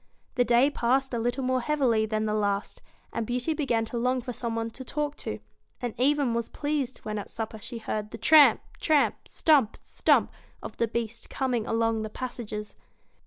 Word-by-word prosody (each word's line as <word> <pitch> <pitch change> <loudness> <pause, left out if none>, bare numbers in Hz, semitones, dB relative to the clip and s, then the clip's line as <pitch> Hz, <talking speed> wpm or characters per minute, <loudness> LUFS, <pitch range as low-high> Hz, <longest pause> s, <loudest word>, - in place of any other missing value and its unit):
The 245 - +3
day 245 +4 +4
passed 265 +1 +1
a 235 - 0
little 245 +3 -1
more 255 0 +1
heavily 240 -6 +2
than 215 0 -1
the 210 - 0
last, 205 -1 -1 0.3
and 230 - -1
Beauty 250 +6 -1
began 245 -7 0
to 235 +1 -4
long 255 +2 +1
for 250 0 -5
some 230 -1 -3
one 225 0 -2
to 260 - -8
talk 295 +2 -3
to, - - -4 0.4
and 240 -3 -3
even 280 -1 +3
was 235 -1 -2
pleased 290 -4 -2
when 215 -1 -2
at 200 - -7
supper 220 -1 -5
she 235 - -6
heard 215 -1 -3
the 225 - -8
tramp, 295 +6 +7 0.2
tramp! 305 -3 +2
stump, 280 -9 +3
stump! - - +2 0.3
of - - -8
the 230 - +1
Beast 230 0 -4
coming 250 -4 -1
along 225 -1 +1
the 215 - -4
passages. 215 -3 -6
235 Hz, 190 wpm, -27 LUFS, 225-265 Hz, 0.4 s, tramp